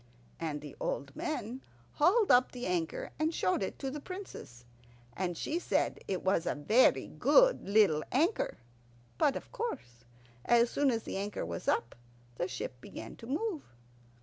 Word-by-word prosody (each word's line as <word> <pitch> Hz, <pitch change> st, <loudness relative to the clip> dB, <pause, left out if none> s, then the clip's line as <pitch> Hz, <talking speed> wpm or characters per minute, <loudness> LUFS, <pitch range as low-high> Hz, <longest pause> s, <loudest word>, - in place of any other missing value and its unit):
And 155 Hz, -3 st, -3 dB
the 145 Hz, -2 st, -9 dB
old 140 Hz, -, -3 dB
men 270 Hz, -7 st, -3 dB, 0.3 s
hauled 395 Hz, +8 st, +4 dB
up 250 Hz, +1 st, +5 dB
the 245 Hz, -1 st, -5 dB
anchor, 170 Hz, -3 st, -2 dB
and 310 Hz, +1 st, +2 dB
showed 185 Hz, +2 st, +1 dB
it 190 Hz, -, -3 dB
to 270 Hz, -1 st, -3 dB
the 295 Hz, -, -5 dB
Princess; 290 Hz, -, -9 dB, 0.5 s
and 175 Hz, -2 st, -2 dB
she 330 Hz, -, -1 dB
said -, -, 0 dB
it 185 Hz, -2 st, -2 dB
was 185 Hz, -3 st, +1 dB
a -, -, 0 dB
very 215 Hz, -, +4 dB
good -, -, +4 dB
little 200 Hz, -8 st, +4 dB
anchor. 325 Hz, -, +1 dB, 0.6 s
But, 280 Hz, -, +3 dB
of -, -, -7 dB
course, 125 Hz, -, -5 dB, 0.4 s
as 235 Hz, 0 st, +4 dB
soon 285 Hz, -1 st, +2 dB
as 230 Hz, -3 st, 0 dB
the -, -, -4 dB
anchor 200 Hz, -, -3 dB
was 85 Hz, 0 st, -6 dB
up 115 Hz, -, +1 dB, 0.4 s
the 175 Hz, -, -1 dB
ship 125 Hz, -8 st, -6 dB
began 110 Hz, -, -8 dB
to 230 Hz, -, -10 dB
move. 320 Hz, -, -1 dB
225 Hz, 165 wpm, -32 LUFS, -, 0.6 s, up